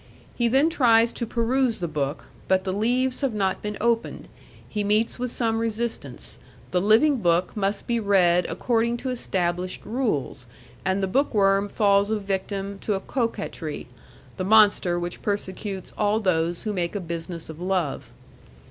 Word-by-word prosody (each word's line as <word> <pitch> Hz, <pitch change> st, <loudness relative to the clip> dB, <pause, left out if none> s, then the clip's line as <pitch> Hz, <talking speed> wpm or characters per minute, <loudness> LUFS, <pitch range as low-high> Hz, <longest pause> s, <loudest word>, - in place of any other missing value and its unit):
He 240 Hz, -, +1 dB
then 275 Hz, +7 st, +3 dB
tries 235 Hz, -6 st, +4 dB
to 235 Hz, -, -3 dB
peruse 240 Hz, +1 st, +1 dB
the 175 Hz, -, -2 dB
book, 145 Hz, -1 st, -3 dB, 0.2 s
but 190 Hz, 0 st, +2 dB
the 185 Hz, -, -2 dB
leaves 250 Hz, +5 st, 0 dB
have 265 Hz, -6 st, 0 dB
not 190 Hz, -2 st, 0 dB
been 210 Hz, -1 st, -4 dB
opened; 230 Hz, 0 st, -1 dB, 0.4 s
he 210 Hz, -1 st, -2 dB
meets 215 Hz, +4 st, +1 dB
with 250 Hz, 0 st, -1 dB
some 225 Hz, -1 st, +1 dB
resistance, 230 Hz, +1 st, -3 dB, 0.3 s
the 180 Hz, -, +2 dB
living 230 Hz, +9 st, +4 dB
book 175 Hz, -3 st, +1 dB
must 200 Hz, -1 st, -1 dB
be 235 Hz, -1 st, 0 dB
read 180 Hz, -4 st, +3 dB
according 235 Hz, 0 st, 0 dB
to 255 Hz, +2 st, -3 dB
established 180 Hz, -6 st, -2 dB
rules, 205 Hz, -, -2 dB, 0.4 s
and 190 Hz, +1 st, 0 dB
the -, -, +1 dB
book 260 Hz, +5 st, 0 dB
worm 195 Hz, 0 st, +3 dB
falls 200 Hz, -1 st, +3 dB
a 220 Hz, -, +1 dB
victim 195 Hz, 0 st, -3 dB
to 210 Hz, -, -1 dB
a -, -, -1 dB
coquetry, 210 Hz, -, -3 dB, 0.5 s
the -, -, -2 dB
monster 200 Hz, -4 st, +4 dB
which 175 Hz, 0 st, -5 dB
persecutes 200 Hz, -1 st, -4 dB
all 210 Hz, +1 st, +2 dB
those 170 Hz, -4 st, 0 dB
who 215 Hz, -, -2 dB
make 175 Hz, 0 st, -2 dB
a -, -, 0 dB
business 170 Hz, -1 st, -6 dB
of 160 Hz, +1 st, -9 dB
love. 180 Hz, -6 st, -1 dB
205 Hz, 165 wpm, -24 LUFS, 185-230 Hz, 0.5 s, tries